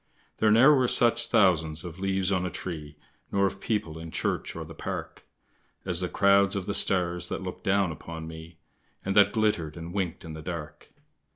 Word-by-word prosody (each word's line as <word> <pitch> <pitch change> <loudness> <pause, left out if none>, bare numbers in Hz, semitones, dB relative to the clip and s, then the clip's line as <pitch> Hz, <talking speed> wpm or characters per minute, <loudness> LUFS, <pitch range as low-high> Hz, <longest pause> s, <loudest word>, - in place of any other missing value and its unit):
There 110 - +3
ne'er 120 +8 +7
were 130 -3 +3
such 120 -1 +4
thousands 85 -9 +3
of 90 0 -9
leaves 95 0 0
on 95 -2 +1
a 90 - -2
tree 75 -4 -7 0.3
Nor 100 0 +2
of 95 0 -3
people 95 -9 -2
in 80 0 -8
church - - -3
or - - -6
the - - -11
Park, - - -6 0.6
As 90 -2 +1
the 90 - -1
crowds 100 0 +3
of 95 -2 -3
the 100 - -2
stars 90 -3 +2
that - - -4
looked 90 0 -7
down 95 -2 +2
upon 80 0 -8
me, 80 +1 -11 0.5
And 95 0 -1
that 100 -1 +6
glittered 105 -9 0
and 85 +1 -8
winked 95 -5 -3
in 80 - -7
the 80 - -8
dark. 75 -2 -8
90 Hz, 195 wpm, -27 LUFS, 80-100 Hz, 0.6 s, ne'er